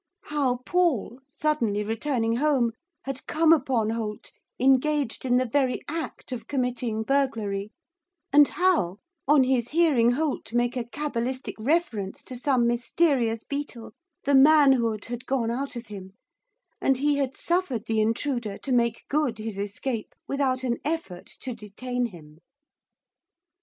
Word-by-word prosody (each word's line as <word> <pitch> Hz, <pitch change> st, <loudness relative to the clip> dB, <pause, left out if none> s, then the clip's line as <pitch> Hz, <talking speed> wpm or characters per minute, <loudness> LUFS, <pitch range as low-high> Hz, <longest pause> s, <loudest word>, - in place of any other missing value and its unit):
How 275 Hz, -4 st, 0 dB
Paul, 330 Hz, -, +1 dB
suddenly 275 Hz, -8 st, 0 dB
returning 230 Hz, +1 st, -1 dB
home, 265 Hz, -4 st, +2 dB, 0.3 s
had 270 Hz, -1 st, -5 dB
come 325 Hz, +1 st, +5 dB
upon 250 Hz, -7 st, +1 dB
Holt 220 Hz, -2 st, -4 dB, 0.3 s
engaged 270 Hz, 0 st, +2 dB
in 250 Hz, -1 st, +3 dB
the 255 Hz, -, +2 dB
very 255 Hz, +1 st, 0 dB
act 320 Hz, -3 st, -5 dB
of 250 Hz, -, -5 dB
committing 250 Hz, -4 st, -1 dB
burglary, 220 Hz, -7 st, 0 dB, 0.6 s
and 290 Hz, 0 st, +8 dB
how, 325 Hz, -, +1 dB, 0.3 s
on 290 Hz, -1 st, +6 dB
his 255 Hz, -2 st, +1 dB
hearing 290 Hz, -8 st, +4 dB
Holt 285 Hz, -5 st, -2 dB
make 240 Hz, +1 st, +1 dB
a 245 Hz, -2 st, -2 dB
cabalistic 260 Hz, -1 st, -3 dB
reference 225 Hz, -, -1 dB
to 255 Hz, -, -7 dB
some 250 Hz, -1 st, +2 dB
mysterious 240 Hz, -1 st, +1 dB
beetle, 280 Hz, -5 st, -5 dB, 0.3 s
the 285 Hz, -, +1 dB
manhood 265 Hz, -6 st, +5 dB
had 240 Hz, +1 st, -6 dB
gone 245 Hz, -4 st, 0 dB
out 270 Hz, +3 st, -3 dB
of 240 Hz, 0 st, -6 dB
him, 195 Hz, -3 st, -9 dB, 0.7 s
and 270 Hz, -, +3 dB
he 290 Hz, +2 st, +2 dB
had 270 Hz, -2 st, -1 dB
suffered 340 Hz, -, -1 dB
the 220 Hz, -1 st, +1 dB
intruder 230 Hz, -1 st, -1 dB
to 275 Hz, -, -5 dB
make 235 Hz, -2 st, +1 dB
good 285 Hz, -6 st, 0 dB
his 215 Hz, -2 st, -5 dB
escape 215 Hz, +3 st, -4 dB
without 265 Hz, -2 st, 0 dB
an 240 Hz, -2 st, -1 dB
effort 300 Hz, -, -3 dB
to 255 Hz, -, -3 dB
detain 245 Hz, +4 st, -3 dB
him. 155 Hz, -6 st, -14 dB
250 Hz, 140 wpm, -26 LUFS, 225-285 Hz, 0.7 s, and